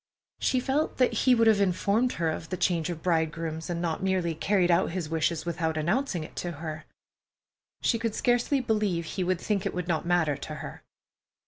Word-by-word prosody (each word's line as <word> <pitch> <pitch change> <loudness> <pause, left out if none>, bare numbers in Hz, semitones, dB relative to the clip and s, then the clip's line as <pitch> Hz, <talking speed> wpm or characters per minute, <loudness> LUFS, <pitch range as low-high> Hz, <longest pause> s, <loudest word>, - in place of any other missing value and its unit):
She 255 - +2
felt 275 +4 -1
that 255 - +3
he 255 -1 +4
would 230 -1 +3
have 215 -2 +5
informed 200 +6 +2
her 165 -2 0
of 160 - -6
the 185 - -3
change 170 -3 +1
of 165 -2 -5
bridegrooms, 160 -1 -1
and 170 -1 -2
not 170 -1 -2
merely 185 -3 0
carried 180 +2 +2
out 170 +2 +3
his 170 -3 -4
wishes 160 +1 0
without 160 -2 -1
announcing 175 - 0
it - - -11
to 175 -1 -3
her. 155 0 -6 1.0
She 230 - +2
could 230 -2 -2
scarcely 245 +3 +2
believe 210 -8 0
he 185 +4 -3
could 180 -1 0
think 200 -1 -1
it - - -3
would 180 -1 -3
not 170 -1 -1
matter 165 -5 +2
to - - -7
her. - - -8
175 Hz, 200 wpm, -28 LUFS, 160-210 Hz, 1.0 s, have